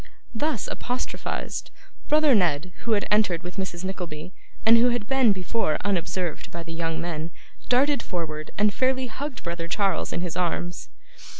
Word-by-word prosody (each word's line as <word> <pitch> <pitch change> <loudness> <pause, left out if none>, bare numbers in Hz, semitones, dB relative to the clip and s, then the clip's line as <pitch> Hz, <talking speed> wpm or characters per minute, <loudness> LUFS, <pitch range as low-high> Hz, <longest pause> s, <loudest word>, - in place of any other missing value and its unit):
Thus 270 -1 0
apostrophised, 250 +1 -3 0.4
brother 300 -2 +5
Ned, 180 -5 +2
who 230 - +3
had 205 - +2
entered 205 -6 +3
with 180 +2 -7
Mrs. 185 -2 -3
Nickleby, 180 -3 -5 0.3
and 225 +1 +9
who 245 +1 +5
had 240 -3 -1
been 265 -4 +5
before 185 -3 0
unobserved 180 -3 -1
by 170 0 -6
the 165 0 -7
young 165 -1 -2
men, 165 -1 -3 0.4
darted 275 +3 +4
forward, 155 -4 -4
and 210 0 +4
fairly 260 +2 +2
hugged 260 +2 -5
brother 170 -1 -3
Charles 195 +2 +1
in 170 - -1
his 175 -2 -3
arms. 175 0 -1
185 Hz, 160 wpm, -26 LUFS, 170-235 Hz, 0.4 s, and